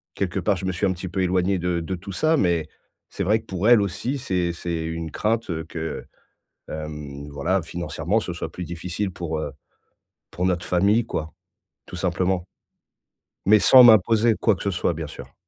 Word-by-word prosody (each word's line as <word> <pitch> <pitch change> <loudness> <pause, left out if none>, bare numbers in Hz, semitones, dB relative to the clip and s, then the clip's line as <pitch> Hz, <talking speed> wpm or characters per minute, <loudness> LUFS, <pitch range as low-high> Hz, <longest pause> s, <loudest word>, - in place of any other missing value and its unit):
quelque 95 -3 -1
part, 100 -3 +1
je 95 - -5
me 95 - 0
suis 85 - -1
un 95 - +2
petit 90 +1 -6
peu 95 +2 -2
éloigné 95 +1 +1
de 90 0 0
de 95 +3 -3
tout 95 +2 -9
ça, 155 - +2
mais 85 - +1 0.4
c'est 100 - -3
vrai 105 +4 +3
que - - -18
pour 95 +4 0
elle 120 -4 +7
aussi, 115 +8 -2
c'est 90 -8 -1
c'est 85 -1 -3
une 80 0 -4
crainte 105 -7 -1
que, 80 -1 -5 0.6
hem, 75 -2 -7
voilà, 80 +7 0
financièrement, 85 +4 -2
ce 90 - -5
soit 85 -1 -5
plus 90 - -6
difficile 90 +3 -4
pour, 80 -2 -4
heu, 75 - -4 0.8
pour 90 +2 -2
notre 90 -1 0
famille 100 +6 +3
quoi, 80 -6 -4 0.5
tout - - -11
simplement, 90 0 -1 1.0
mais 105 - +8
sans 130 +4 +8
m'imposer 110 0 +6
quoi 110 -4 +3
que - - -11
ce 100 - 0
soit 90 -1 0
bien 80 -1 -5
sûr. - - -11
90 Hz, 190 wpm, -23 LUFS, 85-100 Hz, 1.0 s, mais